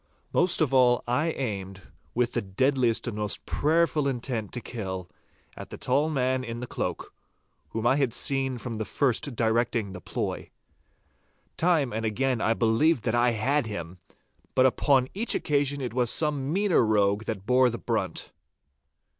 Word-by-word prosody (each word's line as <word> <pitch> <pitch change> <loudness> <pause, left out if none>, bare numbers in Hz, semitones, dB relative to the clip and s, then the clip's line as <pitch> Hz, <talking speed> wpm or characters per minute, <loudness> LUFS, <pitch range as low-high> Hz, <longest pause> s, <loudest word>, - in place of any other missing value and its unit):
Most 175 -1 +4
of 140 -4 +1
all 125 -2 +4
I 145 +7 +1
aimed, 95 -8 -5 0.2
with 120 0 +1
the - - 0
deadliest 120 +4 +1
and 115 - -3
most 105 -1 -3
prayerful 155 -1 +1
intent 120 -5 -3
to 125 - -2
kill, 95 -7 -5 0.5
at - - -9
the - - -8
tall 140 +5 +1
man 130 -3 0
in 115 -1 -5
the 125 - -4
cloak, - - -4 0.6
whom 115 +1 -4
I 130 +3 +4
had 135 -4 +1
seen 135 +1 0
from 115 -1 -6
the - - -1
first 135 +1 0
directing 115 -2 0
the 90 - -8
ploy. - - -4 1.1
Time 160 -8 +1
and 110 +1 -2
again 120 +2 0
I 115 - +2
believed 115 +4 +2
that 110 - 0
I 120 0 +3
had 130 +4 0
him, 90 -4 -6 0.6
but 130 - +5
upon 130 0 +3
each 225 +5 +1
occasion 145 -1 0
it 125 -3 -4
was 125 -1 +1
some 145 -2 0
meaner 195 -3 +3
rogue 105 -1 +2
that 100 -3 -4
bore 125 +1 +4
the 120 - -4
brunt. - - -3
125 Hz, 165 wpm, -27 LUFS, 110-140 Hz, 1.1 s, but